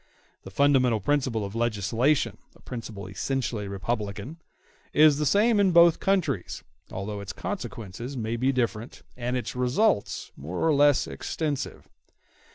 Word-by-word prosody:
The - - -10
fundamental 130 0 +3
principle 130 -2 0
of 100 - -7
legislation—a 115 +5 0
principle 115 -4 -7
essentially 105 +2 -3
republican—is 120 - -1
the 150 - +1
same 210 - +4
in 195 -2 +4
both 170 -1 +6
countries, 165 - -1 0.3
although 100 +2 -4
its 100 0 -6
consequences 125 - -6
may 115 0 -2
be 130 +3 +1
different, 120 -3 -3
and 125 +1 -2
its 125 - -4
results 125 - +1
more 80 +6 -6
or 160 - +4
less 145 -1 +4
extensive. 150 -4 -4
125 Hz, 125 wpm, -26 LUFS, 105-145 Hz, 0.3 s, both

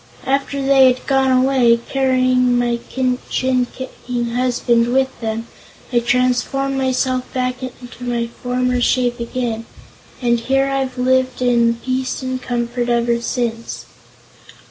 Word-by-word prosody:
After 275 +1 0
they 270 -1 +5
had 250 - -6
gone 270 -1 +2
away, 255 -2 +4
carrying 255 -2 +2
my 240 -1 0
shin 255 -1 0 0.5
kicking 245 -2 -5
husband 240 -1 +1
with 265 +1 +2
them, 225 0 -3 0.5
I 240 - +5
transformed 250 +3 +1
myself 260 -1 0
back 255 0 -1
to 250 -1 -9
my 240 -1 -1 0.2
former 250 0 0
shape 245 0 +1
again, 235 -1 -3 0.5
and 240 -2 +2
here 270 +3 +1
I've 270 -2 -2
lived 255 0 +1
in 235 -1 +3
peace 255 +2 -3
and 255 0 -3
comfort 240 0 -2
ever 235 0 +1
since." 230 -1 -3
250 Hz, 125 wpm, -19 LUFS, 240-260 Hz, 0.5 s, they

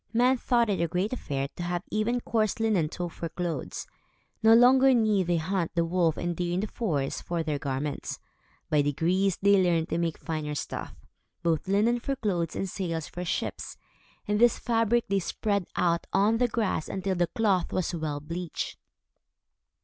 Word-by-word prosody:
Men 250 +3 +4
thought 240 -1 +2
it 185 -4 0
a 170 - +2
great 185 +7 -1
affair 140 - -3
to - - -6
have 175 +1 -2
even 230 +3 0
coarse 220 -2 0
linen 205 -9 +2
tow 175 +1 -4
for 165 0 -6
clothes. 175 -1 -4 0.6
No 225 0 +7
longer 260 +2 +6
need 210 -6 +2
they 175 -1 +2
hunt 175 +1 -2
the 170 -1 +2
wolf 165 -2 +1
and 175 0 -2
deer 175 0 -1
in 185 - 0
the - - -1
forest, 160 - -2
for 170 -1 -2
their 150 -2 -2
garments. 140 +1 -3 0.5
By 150 -1 +4
degrees, 170 +7 +1
they 200 -1 +5
learned 170 -2 +1
to 165 - -1
make 165 -2 -1
finer 155 -3 -4
stuff, - - -5 0.5
both 165 -1 0
linen 215 +5 +2
for 275 +3 -2
clothes 180 -9 -1
and 195 - -2
sails 165 -4 -3
for 175 - -6
ships, 175 - -3 0.5
and 210 0 +1
this 240 -1 +5
fabric 230 0 +1
they 195 0 +1
spread 200 +1 -1
out 170 -1 +1
on 210 +4 +3
the 245 - +3
grass 220 -8 -1
until 190 0 -2
the 175 -1 +1
cloth 195 -3 +1
was 185 -1 -1
well 155 -3 -3
bleached. 165 +3 -5
180 Hz, 180 wpm, -28 LUFS, 165-215 Hz, 0.6 s, No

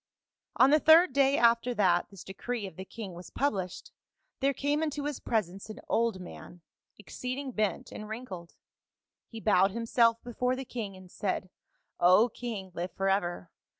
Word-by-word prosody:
"On 265 - +6
the 305 - +6
third 320 0 +6
day 275 0 +4
after 235 +1 +3
that 180 -5 +2
this 195 -3 -11
decree 225 +3 -4
of 190 - -9
the 190 - -7
king 205 -3 -8
was 175 +1 -10
published, 190 -10 -2 0.5
there 275 0 +2
came 285 +3 0
into 295 -2 -2
his 295 -2 -3
presence 195 -2 -2
an 215 - -8
old 230 -4 +1
man, 180 -1 -11 0.4
exceeding 255 +6 -5
bent 215 -4 -1
and 215 0 -8
wrinkled; 205 -7 -7 0.7
he 225 - -9
bowed 195 -3 +4
himself 230 +1 +2
before 250 +1 -1
the 265 +1 -6
king 210 -6 -6
and 185 -1 -15
said, 185 -3 -3 0.3
' - - -50
O 210 +7 +6
king, 220 -6 -6
live 180 +1 -4
forever 190 -3 -1
220 Hz, 165 wpm, -30 LUFS, 190-250 Hz, 0.7 s, On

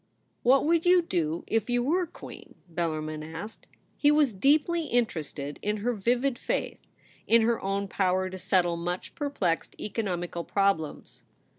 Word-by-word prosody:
HAT 265 +3 +5
would 330 +1 +3
you 355 0 +5
do 165 - -1
if 225 +1 0
you 245 0 +2
were 345 +6 +1
Queen - - -12
?' 180 - -33
Bellarmin 155 -2 -2
asked. 165 +8 -8 0.3
He 290 - +3
was 295 -5 +4
deeply 305 - +2
interested 155 - -2
in 210 +1 -1
her 240 +4 -1
vivid 240 +4 0
faith - - -2 0.3
— - - -28
in 230 0 +5
her 230 0 +1
own 195 +1 -1
power 185 -1 +1
to 185 0 -7
settle 175 -2 +2
much 175 +2 -4
perplexed 250 - -2
economical 175 -5 -3
problems. 195 -7 -1
200 Hz, 155 wpm, -28 LUFS, 175-255 Hz, 0.3 s, HAT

